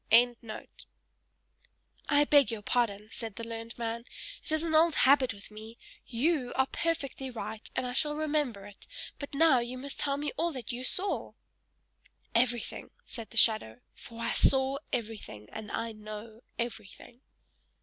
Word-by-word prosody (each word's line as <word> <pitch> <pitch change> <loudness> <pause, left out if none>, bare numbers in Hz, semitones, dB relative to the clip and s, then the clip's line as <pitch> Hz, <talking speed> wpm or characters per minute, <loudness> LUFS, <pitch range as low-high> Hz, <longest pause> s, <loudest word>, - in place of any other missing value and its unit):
"I 290 0 +6
beg 290 -1 +5
your 225 -3 -4
pardon," 215 -3 0
said 225 -4 -6
the 230 - -6
learned 230 0 -6
man; 235 0 -3 0.4
"it - - +1
is 315 +1 +1
an 330 -1 -1
old 320 0 +5
habit 265 -1 +5
with 200 0 -11
me. 220 +2 -10 0.3
YOU 260 +1 +1
are 265 - +4
perfectly 275 -4 -2
right, 220 -2 -6
and - - 0
I 245 - -3
shall 295 +3 +1
remember 295 -9 0
it; 205 -1 -13 0.3
but 285 -1 -6
now 310 -4 +6
you 240 +2 -3
must 275 +2 -6
tell 280 -1 +1
me 295 0 -2
all 335 -2 0
YOU 245 0 -4
saw!" 375 +9 +1 1.0
"Everything!" 240 0 +1 0.2
said 230 -3 -7
the 230 - -10
shadow. 125 - +4
"For 230 -1 -11
I 230 - 0
saw 265 +1 +3
everything, 210 - -4
and 215 -1 -7
I 230 0 -2
know 215 +1 -9 0.2
everything!" 235 +1 -6
240 Hz, 150 wpm, -31 LUFS, 220-280 Hz, 1.0 s, I